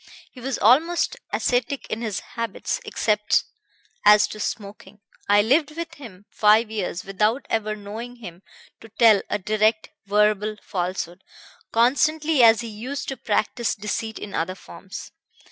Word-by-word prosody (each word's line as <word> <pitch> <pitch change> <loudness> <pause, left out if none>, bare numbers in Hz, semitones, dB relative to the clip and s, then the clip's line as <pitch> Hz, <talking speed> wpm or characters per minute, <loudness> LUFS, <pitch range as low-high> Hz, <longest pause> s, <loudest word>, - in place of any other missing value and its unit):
He 250 - -13
was 265 +1 -2
almost 325 - +3 0.2
ascetic 250 +2 0
in 220 - -3
his 215 -4 -3
habits, 230 - -3
except 210 - +1 0.6
as 210 0 +7
to 215 - -8
smoking. 205 -1 -6 0.3
I 205 0 +5
lived 295 +6 +2
with 335 0 -5
him 215 - -12
five 215 +1 +4
years 185 -4 -3
without 210 +7 0
ever 215 -1 0
knowing 215 +4 -8
him 180 -7 -11 0.4
to 225 - -14
tell 220 -2 +5
a - - 0
direct 215 +2 +1 0.2
verbal 210 +1 +2
falsehood, 180 0 -4 0.5
constantly 295 +5 +3
as 225 -1 +6
he 235 - -6
used 240 +6 -5
to 270 - -3
practise 225 +2 -1
deceit 215 +1 -4
in 205 - -8
other 175 +3 -2
forms. 195 +1 -10
215 Hz, 145 wpm, -23 LUFS, 205-245 Hz, 0.6 s, as